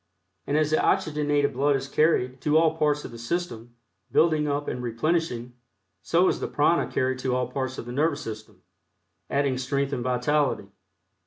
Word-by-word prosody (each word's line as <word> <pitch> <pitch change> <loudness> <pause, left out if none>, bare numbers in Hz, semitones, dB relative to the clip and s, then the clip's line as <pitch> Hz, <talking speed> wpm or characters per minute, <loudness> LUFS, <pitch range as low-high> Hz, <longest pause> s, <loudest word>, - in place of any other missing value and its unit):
And 145 - +1
as 155 0 +1
the 155 - +2
oxygenated 145 -2 +1
blood 140 +3 +2
is 135 0 -3
carried 135 -4 +1
to 150 +1 +3
all 160 -1 +3
parts 150 -2 +1
of - - -7
the 115 - -10
system, 120 -4 -4 0.4
building 155 -2 +3
up 145 0 -2
and 125 - -3
replenishing, 125 0 -1 0.5
so - - +3
is - - +1
the - - -3
prana - - +1
carried 130 0 0
to 130 -1 -1
all 125 0 0
parts 130 0 -3
of - - -6
the 120 - -7
nervous 145 +2 0
system, 110 -4 -9 0.7
adding 140 -2 0
strength 140 +2 -1
and 125 -3 -2
vitality. 125 -3 0
140 Hz, 175 wpm, -26 LUFS, 125-150 Hz, 0.7 s, to